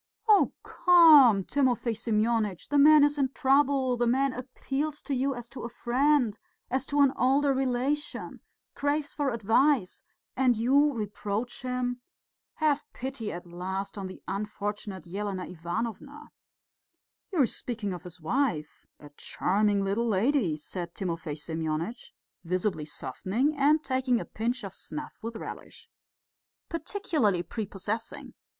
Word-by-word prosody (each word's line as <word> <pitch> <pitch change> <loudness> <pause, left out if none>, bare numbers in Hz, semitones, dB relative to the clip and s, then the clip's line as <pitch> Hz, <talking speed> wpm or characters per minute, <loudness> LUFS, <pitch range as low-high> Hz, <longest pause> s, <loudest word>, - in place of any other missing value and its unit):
"Oh, 420 -2 +5
come, 300 - +7
Timofey 250 -2 +1
Semyonitch! 215 -3 0
The 290 0 +3
man 300 +1 +8
is 290 0 +2
in 265 -1 +2
trouble, 270 -2 +2
the 240 0 +1
man 265 +2 +2
appeals 275 +4 -4
to 285 - -3
you 270 +1 0
as 240 -1 -8
to 270 - -8
a 235 - -4
friend, 245 -1 +1 0.3
as 260 +1 -1
to 290 0 +2
an 275 -1 +5
older 275 +2 +3
relation, 265 +3 -2 0.3
craves 290 +1 -1
for 290 -2 0
advice 230 0 +2 0.3
and 250 -3 +3
you 275 +6 +4
reproach 210 0 -4
him. 250 -1 -2 0.5
Have 300 -2 +1
pity 255 -4 -5
at 175 +1 -7
least 190 +3 -5
on 195 -2 -5
the 185 - -11
unfortunate 205 -2 -4
Elena 190 +1 -4
Ivanovna!" 220 - -5 1.0
"You 350 -6 +2
are - - +6
speaking 225 -4 -4
of 175 - -7
his 180 0 -11
wife? 165 - -2
A 145 - -12
charming 200 +1 +1
little 205 +5 0
lady," 215 - +1
said 170 +2 -6
Timofey 165 -5 -3
Semyonitch, 160 +7 -4 0.3
visibly 180 -2 -1
softening 205 - -2
and 295 +2 +3
taking 260 -2 +1
a - - -5
pinch 235 +2 -3
of 195 -2 -6
snuff 300 +7 -7
with 230 +1 -5
relish. 455 - -9 0.8
"Particularly 315 - 0
prepossessing. 210 +3 -5
240 Hz, 135 wpm, -28 LUFS, 195-275 Hz, 1.0 s, man